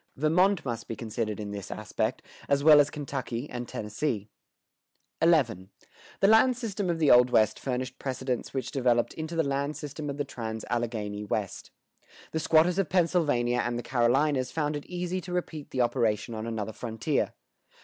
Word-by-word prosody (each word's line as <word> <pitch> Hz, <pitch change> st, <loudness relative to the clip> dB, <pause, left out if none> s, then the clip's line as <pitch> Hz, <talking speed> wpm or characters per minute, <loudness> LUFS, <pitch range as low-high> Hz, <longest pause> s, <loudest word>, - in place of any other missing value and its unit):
Vermont 175 Hz, +6 st, +2 dB
must 115 Hz, -3 st, -4 dB
be 115 Hz, -, -4 dB
considered 110 Hz, -1 st, -3 dB
in 105 Hz, -1 st, -5 dB
this 100 Hz, -3 st, -6 dB
aspect, -, -, -3 dB, 0.3 s
as 140 Hz, 0 st, +2 dB
well 150 Hz, -1 st, +9 dB
as 145 Hz, 0 st, +4 dB
Kentucky 135 Hz, -3 st, -4 dB
and 120 Hz, -2 st, -6 dB
Tennessee.[122:2] 125 Hz, -, -2 dB
XI. 95 Hz, -5 st, -10 dB, 0.5 s
The 195 Hz, -, +6 dB
land 225 Hz, +4 st, +5 dB
system 205 Hz, -6 st, -3 dB
of 170 Hz, -, 0 dB
the 155 Hz, -3 st, +4 dB
Old 125 Hz, 0 st, +7 dB
West 110 Hz, -4 st, +3 dB
furnished 130 Hz, 0 st, -3 dB
precedents 130 Hz, -2 st, -3 dB
which 130 Hz, -2 st, -3 dB
developed 120 Hz, -4 st, +1 dB
into 160 Hz, +1 st, -5 dB
the 165 Hz, -, +2 dB
land 140 Hz, +1 st, -1 dB
system 150 Hz, 0 st, -6 dB
of 140 Hz, -, -4 dB
the 145 Hz, -, -1 dB
trans 110 Hz, -4 st, -5 dB
Alleghany 110 Hz, -4 st, -2 dB
West.[122:3] 105 Hz, -1 st, -7 dB
The 160 Hz, -, -1 dB
squatters 165 Hz, +4 st, +3 dB
of 195 Hz, -, 0 dB
Pennsylvania 150 Hz, -9 st, +2 dB
and 120 Hz, 0 st, -2 dB
the 120 Hz, -, -4 dB
Carolinas 130 Hz, +2 st, +2 dB
found 150 Hz, -2 st, -1 dB
it 145 Hz, -, -6 dB
easy 180 Hz, +1 st, -3 dB
to 180 Hz, -, -8 dB
repeat 165 Hz, -4 st, -4 dB
the 130 Hz, -, -1 dB
operation 115 Hz, -2 st, +1 dB
on 110 Hz, 0 st, -4 dB
another 110 Hz, -1 st, -3 dB
frontier. 115 Hz, +6 st, -2 dB
130 Hz, 170 wpm, -28 LUFS, 115-155 Hz, 0.5 s, well